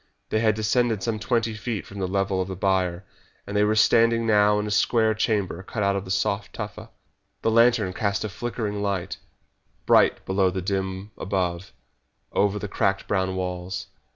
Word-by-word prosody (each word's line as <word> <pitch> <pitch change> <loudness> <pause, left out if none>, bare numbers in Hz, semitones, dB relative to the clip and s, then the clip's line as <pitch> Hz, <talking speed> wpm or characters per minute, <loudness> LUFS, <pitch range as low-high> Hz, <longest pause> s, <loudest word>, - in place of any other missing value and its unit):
They 110 - +1
had 110 -1 +3
descended 110 -1 +1
some 110 0 -1
twenty 115 0 0
feet 110 0 -4
from 100 - -9
the 95 - -1
level 95 0 0
of 95 - -3
the 95 - -5
byre, 95 -1 0 0.4
and 100 - -6
they 105 - +4
were 105 +1 +2
standing 115 +1 +4
now 105 -1 +4
in 105 - -1
a 105 - -4
square 110 +1 +3
chamber 105 -5 -1
cut 105 +2 -4
out 100 0 +2
of 100 - -3
the - - -10
soft 100 +2 -1
tufa. 105 -2 -7 0.5
The 115 - +2
lantern 115 -4 +4
cast 100 +3 -1
a 110 - -3
flickering 105 -1 -4
light, 100 -2 -2 0.7
bright - - +4
below 95 0 +2
and 90 0 -4
dim 95 +1 -3
above, 90 -2 -2 0.6
over 100 0 +2
the 105 - -4
cracked 100 0 0
brown 95 -1 0
walls. 90 0 -4
100 Hz, 180 wpm, -25 LUFS, 95-110 Hz, 0.7 s, they